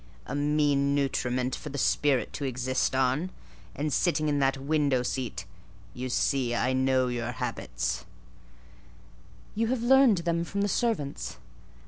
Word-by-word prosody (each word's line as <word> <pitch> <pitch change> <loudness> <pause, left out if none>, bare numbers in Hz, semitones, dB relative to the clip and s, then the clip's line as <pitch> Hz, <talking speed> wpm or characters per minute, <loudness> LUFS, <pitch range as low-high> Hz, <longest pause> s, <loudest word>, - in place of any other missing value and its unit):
"A - - -6
mean 145 -1 +2
nutriment 130 -2 0
for 150 - -8
the 145 - -5
spirit 135 -3 +1
to - - -5
exist 130 0 0
on: 135 +7 +1 0.5
and 150 0 -2
sitting 155 -4 +1
in 145 -1 +1
that 135 0 +2
window 140 -2 +1
seat 120 -7 -3 0.5
(you 125 +1 -5
see 125 -1 +1
I 130 +2 +1
know 130 0 +2
your 120 -1 -3
habits)—" - - -3 1.5
"You 225 +1 0
have 240 -1 -1
learned 265 -4 +6
them 170 0 +1
from 200 +3 -3
the 205 - +2
servants." 150 - -1
140 Hz, 140 wpm, -28 LUFS, 130-155 Hz, 1.5 s, learned